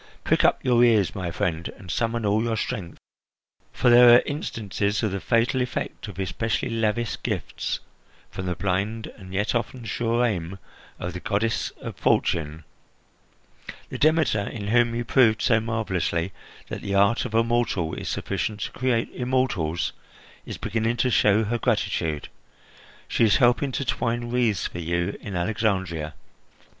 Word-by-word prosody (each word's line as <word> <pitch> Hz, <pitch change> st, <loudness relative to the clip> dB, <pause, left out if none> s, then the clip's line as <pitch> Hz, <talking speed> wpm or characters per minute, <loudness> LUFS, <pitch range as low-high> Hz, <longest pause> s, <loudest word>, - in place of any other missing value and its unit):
Prick -, -, +2 dB
up -, -, +2 dB
your 120 Hz, -1 st, +4 dB
ears, 110 Hz, -6 st, +4 dB
my 90 Hz, -3 st, -3 dB
friend, 85 Hz, -2 st, -2 dB
and 90 Hz, -2 st, -8 dB
summon 115 Hz, +1 st, -1 dB
all 105 Hz, +2 st, +2 dB
your 115 Hz, -1 st, -1 dB
strength, 90 Hz, -5 st, -4 dB, 0.7 s
for 125 Hz, -, +3 dB
there 120 Hz, 0 st, +9 dB
are 120 Hz, -, +5 dB
instances 105 Hz, -, -2 dB
of 110 Hz, -, +1 dB
the 100 Hz, -, -2 dB
fatal 115 Hz, +4 st, +1 dB
effect 125 Hz, -2 st, -4 dB
of 100 Hz, -, -9 dB
especially 110 Hz, +5 st, -2 dB
lavish 115 Hz, 0 st, -1 dB
gifts -, -, -3 dB, 0.5 s
from 95 Hz, -, -5 dB
the 90 Hz, -, -1 dB
blind 100 Hz, +5 st, -1 dB
and 95 Hz, -3 st, -11 dB
yet 100 Hz, +2 st, 0 dB
often 120 Hz, 0 st, -3 dB
sure 115 Hz, +3 st, +1 dB
aim 95 Hz, -4 st, -2 dB, 0.4 s
of 90 Hz, 0 st, -5 dB
the 90 Hz, -, -5 dB
goddess 110 Hz, +4 st, 0 dB
of -, -, -6 dB
Fortune. 80 Hz, -1 st, 0 dB, 1.3 s
The -, -, -6 dB
Demeter, 155 Hz, -7 st, +3 dB
in 100 Hz, -3 st, -5 dB
whom 120 Hz, 0 st, +3 dB
you 120 Hz, 0 st, -2 dB
proved 115 Hz, -3 st, +4 dB
so 115 Hz, -3 st, +4 dB
marvellously 95 Hz, -6 st, -1 dB, 0.4 s
that -, -, -5 dB
the 100 Hz, -, -2 dB
art 100 Hz, +4 st, +3 dB
of 110 Hz, -3 st, -4 dB
a 115 Hz, -, +5 dB
mortal 115 Hz, -8 st, 0 dB
is -, -, -4 dB
sufficient 105 Hz, +2 st, -3 dB
to -, -, -3 dB
create 120 Hz, -2 st, 0 dB
immortals, 110 Hz, -11 st, 0 dB, 0.5 s
is -, -, -5 dB
beginning 115 Hz, +1 st, -1 dB
to 125 Hz, +2 st, +1 dB
show 105 Hz, 0 st, +4 dB
her 115 Hz, +3 st, -1 dB
gratitude. 95 Hz, -, -1 dB, 0.8 s
She -, -, +1 dB
is 110 Hz, -2 st, +5 dB
helping 125 Hz, +3 st, +3 dB
to 140 Hz, -, -2 dB
twine 120 Hz, 0 st, -1 dB
wreaths 120 Hz, -5 st, +1 dB
for 90 Hz, -, -5 dB
you 85 Hz, +3 st, -1 dB
in 100 Hz, -3 st, -6 dB
Alexandria." 90 Hz, -5 st, -1 dB
110 Hz, 160 wpm, -25 LUFS, 95-120 Hz, 1.3 s, there